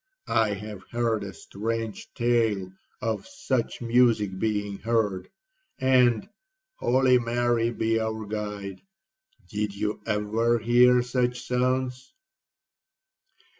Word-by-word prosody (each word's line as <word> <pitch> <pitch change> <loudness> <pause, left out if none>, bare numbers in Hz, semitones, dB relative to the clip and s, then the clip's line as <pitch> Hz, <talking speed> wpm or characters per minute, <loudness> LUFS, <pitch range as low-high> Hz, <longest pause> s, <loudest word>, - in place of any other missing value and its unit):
I 105 -2 +2
have 105 -1 -8
heard 115 -3 0
a 100 - -6
strange 110 +5 -5
tale 115 -6 +1 0.3
of 110 -2 -2
such 130 - -2
music 115 -5 +3
being 105 -2 -1
heard; 105 -4 0 0.5
and—Holy 130 - +2
Mary 120 0 +1
be 115 -1 0
our 110 0 -3
guide! 105 -2 -5 0.7
did 105 -2 -3
you 105 +1 -2
ever 110 +3 +1
hear 120 +2 +5
such 125 0 -1
sounds?' 130 +1 -1
115 Hz, 95 wpm, -26 LUFS, 105-125 Hz, 0.7 s, hear